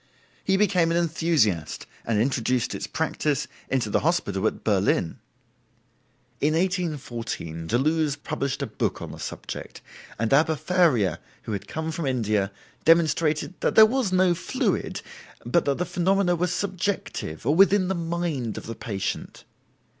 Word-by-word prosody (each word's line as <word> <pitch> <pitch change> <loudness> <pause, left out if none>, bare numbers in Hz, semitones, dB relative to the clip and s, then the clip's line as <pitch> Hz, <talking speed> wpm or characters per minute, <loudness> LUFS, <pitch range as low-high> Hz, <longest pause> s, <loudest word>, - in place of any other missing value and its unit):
He 190 0 +2
became 185 -5 +3
an 165 - +1
enthusiast, 155 - +1 0.2
and 110 -2 +2
introduced 125 0 +1
its - - -4
practice 150 -2 -1 0.2
into 125 -5 0
the - - +3
hospital 110 - +1
at - - -4
Berlin. 95 -5 +1 1.2
In 155 +2 +2
1814 135 - -2
Deleuze 150 - +1
published 140 -1 -3
a - - 0
book - - -2
on - - -7
the - - -10
subject, - - -7 0.4
and 115 +3 0
Abbe 155 +3 +4
Faria, 145 - +2 0.2
who - - -6
had 100 -2 -4
come 160 0 -3
from 160 -2 -3
India, 105 -6 0 0.3
demonstrated 165 0 +3
that - - 0
there 220 - +10
was 240 -3 0
no 185 -1 +4
fluid, 170 - -2 0.4
but 135 +8 +2
that 140 -1 +1
the 180 - -1
phenomena 180 +1 +2
were 175 +2 0
subjective, 185 - -3
or 145 - +3
within 195 +2 +5
the 190 - 0
mind 165 - -2
of - - -7
the 115 - -5
patient. 100 -4 -4
155 Hz, 145 wpm, -25 LUFS, 115-175 Hz, 1.2 s, there